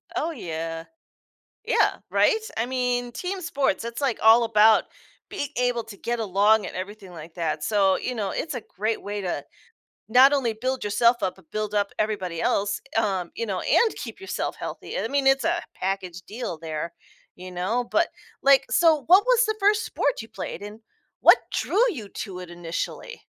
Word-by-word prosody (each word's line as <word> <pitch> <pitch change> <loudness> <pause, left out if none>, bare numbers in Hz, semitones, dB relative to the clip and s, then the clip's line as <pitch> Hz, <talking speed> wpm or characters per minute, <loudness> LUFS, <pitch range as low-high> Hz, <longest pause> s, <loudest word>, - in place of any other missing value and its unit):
Oh, 330 - -1
yeah. 165 - -5 0.8
Yeah, - - +2
right? - - +4 0.2
I 225 - +1
mean, 245 -1 -1
team 370 +8 -4
sports, 280 - 0
it's, 235 +3 -5
like, 265 -5 0
all 225 +2 +7
about 220 0 +5 0.4
being 285 - -4
able 245 -1 +1
to 215 -2 -11
get 240 +3 -3
along 210 +1 +3
and - - -7
everything 195 +1 -7
like 165 -1 -10
that 160 -3 -2
so, 195 0 +2
you 250 - -4
know, 205 -4 -2
it's 315 - -3
a 245 - -4 0.2
great 215 +3 -1
way 205 0 -4
to 180 -2 -3 0.6
not 255 +5 +7
only 255 -5 +1
build 255 +4 -2
yourself 235 +4 +3
up, 185 -1 -1
but 185 -5 -22
build 215 -1 -3
up 205 -1 +1
everybody 190 -6 -2
else, 200 0 0 0.2
um, 190 -6 0
you 230 - -2
know, 195 -4 -2
and 460 -2 +2
keep - - -8
yourself 385 - -3
healthy, - - -6
I - - -1
mean, 280 -1 0
it's 270 0 +4
a 345 +1 +1 0.2
package 185 -2 -3
deal 215 -7 -5
there, 160 +1 -4 0.4
you 185 +1 -9
know, 190 +8 -1
but, 335 - +2 0.3
like 275 0 +6
so 320 -4 +4
what 370 +4 +7
was - - +4
the 435 - 0
1st 420 +2 +3
sport - - -1
you - - -10
played - - -6
and 210 +2 -9 0.4
what - - +8 0.2
drew 425 - +1
you 225 - -7
to 190 -3 -6
it 180 -1 -9
initially? 175 - -5
220 Hz, 185 wpm, -25 LUFS, 190-265 Hz, 0.8 s, what